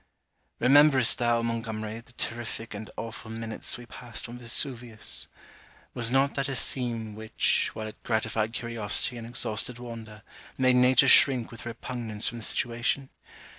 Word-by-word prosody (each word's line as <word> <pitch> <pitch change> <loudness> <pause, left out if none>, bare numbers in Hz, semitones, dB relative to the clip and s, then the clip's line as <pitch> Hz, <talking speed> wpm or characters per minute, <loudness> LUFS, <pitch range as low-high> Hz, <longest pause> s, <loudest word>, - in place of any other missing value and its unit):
Rememberest 135 -1 +5
thou, 120 -1 +2
Montgomery, 115 -1 -3
the 120 +1 -17
terrific 115 -1 -4
and 105 +1 -7
awful 115 0 -7
minutes 115 0 -3
we 120 - -11
past 120 0 -7
on 120 +1 -9
Vesuvius! 120 -1 -1 0.7
Was 120 -1 +1
not 135 +2 +2
that 140 +1 -2
a 135 - -2
scene 115 -5 0
which, 110 +1 0
while 110 - -5
it 110 - -10
gratified 110 -1 -1
curiosity 115 0 -2
and 115 -1 -7
exhausted 115 0 -1
wonder, 115 -3 -9 0.3
made 130 -1 +4
nature 125 +2 +5
shrink 125 -3 +7
with 115 0 -9
repugnance 115 -2 -4
from 120 - -2
the - - -7
situation? 120 +5 -1
115 Hz, 145 wpm, -27 LUFS, 110-125 Hz, 0.7 s, shrink